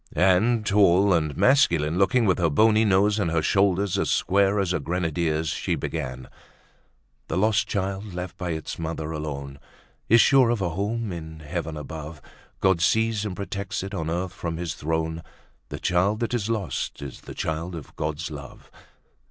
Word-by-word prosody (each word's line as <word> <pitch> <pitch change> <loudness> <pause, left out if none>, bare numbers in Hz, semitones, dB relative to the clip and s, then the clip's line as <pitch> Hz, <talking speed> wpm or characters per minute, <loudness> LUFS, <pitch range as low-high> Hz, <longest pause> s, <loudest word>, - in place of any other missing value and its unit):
'" - - -21 0.2
And, 110 +3 +1
tall 100 -1 +4
and 75 -4 0
masculine 85 - +3
looking, 115 +5 +3
with 95 -3 +2
her 85 -2 +3
bony 110 +8 +4
nose 100 +1 +3
and 95 -5 +1
her 80 -1 0
shoulders 100 0 +2
as - - 0
square 100 +1 +2
as 95 -2 0
a - - 0
grenadier's 80 -1 -1
she - - -1
began: 65 -5 -5 1.0
"The 80 - -2
lost 105 +1 +2
child 100 0 -3
left 90 0 -5
by 90 - -4
its 80 0 -4
mother 80 -1 -4
alone 70 -3 -5 0.5
Is 115 - +7
sure 135 -2 +5
of 120 -2 +1
a 95 -3 0
home 105 +5 -2
in 80 -2 -8
Heaven 80 +1 -4
above, 75 +1 -7 0.4
God 95 -3 +3
sees 110 +3 +2
and 100 -3 -4
protects 100 -1 -4
it 95 +1 -6
on 80 -5 -3
earth 90 +2 -2
from 85 -2 -4
His 85 -1 -3
throne, 80 +1 -2 0.5
The - - -5
child 95 +5 +1
that 115 - -1
is 115 -3 -1
lost 105 -9 -3
is 70 -3 -8
the - - -10
child 80 +3 -3
of 80 - -10
God's 75 +1 -3
love." 70 -3 -10
90 Hz, 175 wpm, -25 LUFS, 80-100 Hz, 1.0 s, Is